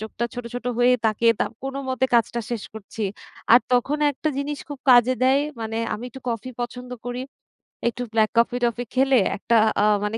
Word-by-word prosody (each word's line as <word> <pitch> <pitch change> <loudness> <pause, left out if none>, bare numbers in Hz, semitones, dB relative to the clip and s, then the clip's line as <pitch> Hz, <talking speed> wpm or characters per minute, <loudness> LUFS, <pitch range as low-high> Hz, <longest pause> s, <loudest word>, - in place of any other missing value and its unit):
চোখটা 220 +2 -4
ছোট, 245 - -6
ছোট 245 0 -5
হয়ে 245 +1 +5
তাকিয়ে 230 +2 +3
তা - - +4 0.2
কোনো 270 +1 -4
মতে 260 0 0
কাজটা 235 +1 +2
শেষ 235 -3 -3
করছি। 220 +1 -7 0.5
আর 240 - +9
তখন 270 +5 +2
একটা 290 +3 -3
জিনিস 285 +1 -3
খুব 290 -2 -7
কাজে 245 +1 +6
দেয়, 265 +2 +4 0.2
মানে 225 0 -4 0.2
আমি 220 - -7
একটু 265 +2 -11
কফি 230 +2 -3
পছন্দ 250 +1 -5 0.2
করি। 245 +1 -3 0.7
একটু 245 +1 -2
ব্লাক 220 -1 +3
কফি-টফি 240 0 +1
খেলে 265 0 +4 0.2
একটা 235 - 0 0.3
আ - - +3 0.2
মানে 210 +2 -2
245 Hz, 185 wpm, -23 LUFS, 230-255 Hz, 0.7 s, আর